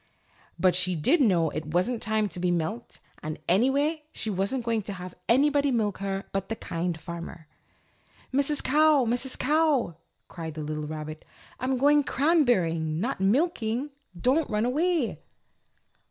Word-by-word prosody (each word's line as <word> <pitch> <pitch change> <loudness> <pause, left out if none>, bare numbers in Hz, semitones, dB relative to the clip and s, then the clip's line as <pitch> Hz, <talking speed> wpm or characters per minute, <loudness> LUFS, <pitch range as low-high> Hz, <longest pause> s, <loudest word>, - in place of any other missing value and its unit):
But 185 -1 +3
she 185 0 +2
did 275 - +3
know 175 - +3
it 155 - -4
wasn't 220 +7 +1
time 215 -1 +1
to 175 - -6
be 180 0 +1
milked, 175 +7 -3 0.2
and, 155 -2 -5
anyway, 280 - +2
she 220 - -3
wasn't 200 +6 -1
going 230 -2 +1
to 200 0 -6
have 180 -1 -8 0.2
anybody 285 +3 +4
milk 215 -6 0
her 195 0 -3
but 195 -1 -3
the 225 - -2
Kind 170 -4 -3
Farmer. 170 -1 -8 0.9
"Mrs. 280 +2 +1
Cow! 300 -2 +4
Mrs. 245 +3 -1
Cow!" 290 - +2 0.3
cried 160 -3 -7
the 155 - -4
little 150 0 -4
rabbit, 155 0 -6 0.4
"I'm 255 +1 0
going 290 +3 +4
cranberrying, 185 - +2
not 230 0 -2
milking. 250 - +1 0.3
Don't 275 - +2
run 210 +1 0
away!" 310 +1 0
220 Hz, 150 wpm, -27 LUFS, 175-275 Hz, 0.9 s, anybody